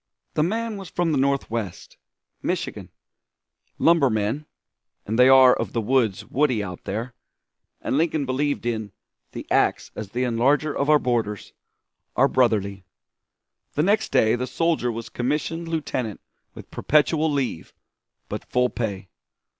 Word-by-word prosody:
The - - +1
man 220 +6 -1
was 195 -3 -8
from 175 -2 0
the 150 - +1
Northwest 115 -8 -2 0.5
Michigan. - - -3 0.9
Lumbermen 135 -4 +2 0.6
and 110 +3 -2
they 125 +1 +7
are 130 -1 +8
of - - -4
the 115 - 0
woods 115 -3 +1
woody 130 -6 +1
out 90 -3 -8
there 120 +3 -4 0.7
and 135 - 0
Lincoln 160 -3 +1
believed 140 +1 -1
in 110 -4 -3 0.4
"the - - -6
ax - - +2
as 105 -2 -6
the 125 +4 -2
enlarger 135 +5 +1
of 140 - 0
our 150 - +7
borders" 115 -6 -2 0.6
are 135 - +5
brotherly. 105 -7 +1 0.9
The 150 - +2
next 205 +4 +1
day 115 -4 +4
the 125 +1 -3
soldier 165 -7 0
was 115 0 -6
commissioned 150 +6 -2
lieutenant 145 -9 -3 0.4
with - - -12
perpetual 155 +1 +2
leave, 135 - -2 0.6
but - - -6
full 125 0 +2
pay. 100 -5 -4
130 Hz, 140 wpm, -24 LUFS, 115-150 Hz, 0.9 s, are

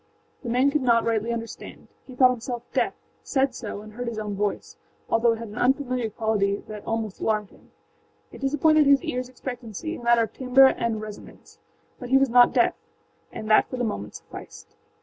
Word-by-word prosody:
The 240 - -6
man 255 +4 +3
could 300 0 0
not 235 -2 +3
rightly 230 0 0
understand: 230 -1 -7 0.2
he 255 - -11
thought 255 0 +6
himself 240 0 -5
deaf; - - 0 0.3
said 270 -2 0
so, 215 -4 -6
and 215 0 -12
heard 245 +2 -5
his 230 -2 -4
own 210 -1 -3
voice, 205 - -3 0.3
although 230 0 +3
it - - -5
had 230 -1 -7
an 210 - -7
unfamiliar 255 -3 +1
quality 205 -2 -1
that 210 -1 -8
almost 225 -3 -3
alarmed 215 -2 -1
him; - - -21 0.6
it - - -12
disappointed 300 +2 +3
his 280 -2 +5
earsâ 250 0 -3
expectancy 245 - -6
in - - -7
the - - -12
matter 235 -1 +5
of 220 - -5
timbre 265 +1 +5
and 225 -2 -2
resonance. 215 -1 -11 0.4
But 245 - -7
he 265 - +5
was 270 -1 +3
not 245 0 +7
deaf, - - +3 0.6
and 220 -1 -7
that 215 - +5
for 255 - -5
the 245 - -1
moment 215 -3 -4
sufficed. - - -12
235 Hz, 200 wpm, -25 LUFS, 220-255 Hz, 0.6 s, not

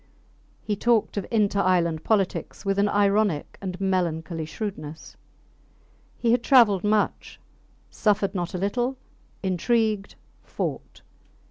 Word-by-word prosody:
He 210 - -1
talked 230 +1 +1
of 200 - -3
inter 210 -3 +1
island 170 -4 +1
politics 205 -1 -1
with 195 0 0
an 205 +1 +3
ironic 200 -5 +1
and 185 -2 -5
melancholy 170 -4 -1
shrewdness. 160 -3 -7 1.0
He 235 - +1
had 245 - +3
travelled 230 -8 +5
much, 210 0 0 0.5
suffered 205 -2 +1
not 180 -2 -3
a - - -1
little, 240 +7 -1 0.5
intrigued, 210 +2 0 0.3
fought. - - -5
200 Hz, 115 wpm, -25 LUFS, 180-215 Hz, 1.0 s, travelled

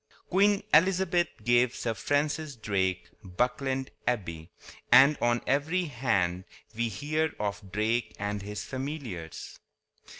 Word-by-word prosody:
Queen 200 +2 +3
Elizabeth 175 +1 +4 0.2
gave 120 0 +3
Sir 115 - -2
Francis 145 +4 -1
Drake 95 -5 -1 0.2
Buckland 130 +7 -1 0.2
Abbey; 85 -9 -2 0.4
and 140 +3 +8
on 120 0 +2
every 160 +7 +1
hand 95 - 0 0.3
we 115 +1 0
hear 155 +8 -1
of 100 -2 -4
Drake 110 +4 0
and 105 0 -3
his 105 +1 -5
familiars. 130 - -6
120 Hz, 110 wpm, -28 LUFS, 105-150 Hz, 0.4 s, and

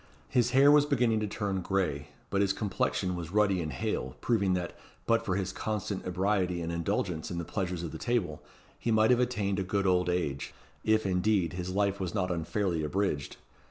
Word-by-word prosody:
His 120 -2 +2
hair 135 +3 +6
was 145 0 +5
beginning 120 -6 +2
to 105 - -1
turn 100 -2 -2
gray, 85 -7 -1 0.2
but 100 - +2
his 100 -1 +2
complexion 95 -3 -1
was 85 -1 -6
ruddy 100 -3 +3
and 80 -2 -3
hale, 65 -1 -3
proving 100 -6 +1
that, 90 -1 -3 0.3
but 115 0 +2
for 95 -4 -1
his 95 -1 -1
constant 105 -3 -3
ebriety 90 -1 0
and 85 0 -3
indulgence 85 -1 -2
in 85 - -4
the 85 - -3
pleasures 90 -2 -3
of 85 - -4
the - - -7
table, 105 -11 -1 0.4
he - - -2
might 110 +1 +4
have 125 - +4
attained 105 -6 0
a - - 0
good 100 +1 -1
old 90 -1 +3
age 80 -6 -2 0.3
if, 110 -1 +2
indeed, 95 -1 +1
his 90 0 -4
life 100 +1 0
was 95 +1 -3
not 90 -3 0
unfairly 85 0 -1
abridged. 75 -2 -1
95 Hz, 195 wpm, -30 LUFS, 90-105 Hz, 0.4 s, hair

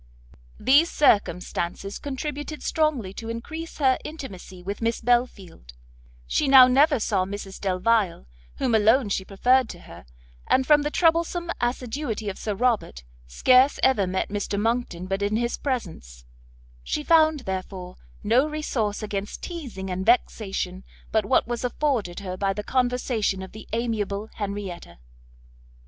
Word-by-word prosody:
These 290 +6 +5
circumstances 195 - 0
contributed 290 +2 -5
strongly 285 -12 0
to 225 +2 -7
encrease 315 +9 -6
her 265 -3 +3
intimacy 190 - -9
with 200 +4 -5
Miss 230 0 0
Belfield; 220 - -1 0.5
she - - 0
now 265 -1 +9
never 280 +2 +4
saw 200 -3 +1
Mrs 195 0 -7
Delvile, 190 - +1 0.3
whom 250 - -1
alone 220 +2 +4
she 195 - -1
preferred 245 +6 +2
to 175 - -9
her, 85 -6 -13 0.4
and 260 - +3
from 295 +1 +5
the 295 - -1
troublesome 335 +1 +1
assiduity 240 -2 -2
of 190 - -7
Sir 210 -2 -3
Robert, 220 - 0 0.2
scarce 255 - +4
ever 220 -8 +3
met 190 +1 -2
Mr 205 0 -2
Monckton 225 -5 -1
but 195 +1 -2
in 205 +1 0
his 235 +1 0
presence; 160 - -5 0.6
she 300 - -3
found, 315 -2 +4
therefore, 185 -3 -6 0.3
no 240 +7 +3
resource 230 -9 -2
against 205 -1 -5
teazing 245 - -6
and 185 +1 -2
vexation, 195 -5 0 0.3
but 220 -2 +2
what - - +3
was 240 0 -3
afforded 245 -8 -1
her 185 -2 -5
by 195 +1 0
the 210 +1 -5
conversation 245 -5 0
of 190 - -10
the 215 0 -11
amiable 220 -2 -2
Henrietta. 200 - -6
220 Hz, 140 wpm, -25 LUFS, 195-260 Hz, 0.6 s, now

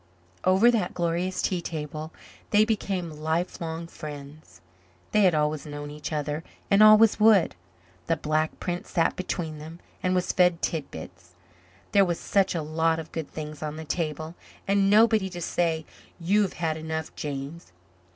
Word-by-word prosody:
Over 190 +6 +5
that 210 -7 -1
glorious 175 +2 -1
tea 180 -2 0
table 155 -1 -5 0.4
they 210 +1 +5
became 195 -6 -2
life 160 +4 -2
long 165 0 -4
friends. 145 - -10 0.5
They 210 - +4
had 180 -3 +4
always 150 0 0
known 145 0 -6
each 150 +1 -6
other 150 +1 -2 0.3
and 200 +1 +6
always 215 0 +7
would. 210 -5 +5 0.5
The 165 - +1
Black 155 0 -1
Prince 175 -1 -4
sat 165 -2 +1
between 165 -4 -4
them 160 +3 -10 0.2
and 185 0 +1
was 180 - +1
fed 180 -2 +3
tit 160 -4 -2
bits. 90 +2 -11 0.6
There 200 - +6
was 175 -3 -1
such 195 -2 +1
a 165 - -1
lot 160 +1 +1
of 160 -1 -7
good 160 -3 -5
things 155 -1 -7
on 155 -1 -4
the 160 0 -7
table 155 -1 -3 0.3
and 195 0 +3
nobody 215 -2 +4
to 175 -1 -7
say 165 -2 -1 0.3
"You 195 +5 +2
have 195 - 0
had 160 -2 -2
enough, 160 0 -5
James." 145 - -6
165 Hz, 165 wpm, -26 LUFS, 155-185 Hz, 0.6 s, always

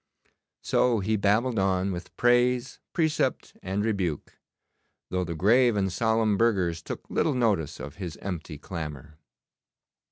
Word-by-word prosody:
So 120 -3 +2
he 105 +3 0
babbled 110 +3 +2
on 95 0 +1
with 90 0 -7
praise, 120 +1 +2
precept, 160 -3 0
and 100 +3 -2
rebuke, 95 -9 -2 0.7
though 90 0 0
the 85 -1 -4
grave 115 +7 +4
and 95 -3 0
solemn 110 -2 +2
burghers 95 -8 +1
took - - -7
little 150 - +1
notice 100 - 0
of 75 +2 -8
his 90 -5 -6
empty 85 -5 -6
clamour. 75 -2 -7
100 Hz, 130 wpm, -27 LUFS, 85-115 Hz, 0.7 s, grave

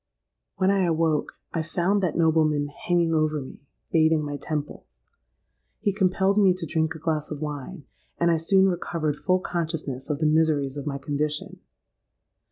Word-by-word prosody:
"When 190 0 +2
I 195 -2 +2
awoke, 160 -2 +1 0.2
I 165 - 0
found 175 +5 0
that 180 -5 0
nobleman 155 -3 +2
hanging 170 +2 0
over 155 -1 +1
me, 130 - -9 0.3
bathing 160 -2 +3
my 145 0 -4
temples. 145 - -6 0.8
He 205 -2 0
compelled 190 +1 +2
me 190 -3 +5
to 185 -2 -5
drink 160 0 -1
a - - -6
glass 155 -1 -2
of 150 - -5
wine; 150 +2 -6 0.3
and 170 0 +3
I 165 - +3
soon 190 +4 +3
recovered 170 -4 -1
full 185 +4 +1
consciousness 160 -7 -3
of 150 - 0
the 155 - -1
miseries 150 -3 +2
of 145 0 -6
my 140 -1 -2
condition. 150 +2 -3
160 Hz, 165 wpm, -25 LUFS, 150-175 Hz, 0.8 s, me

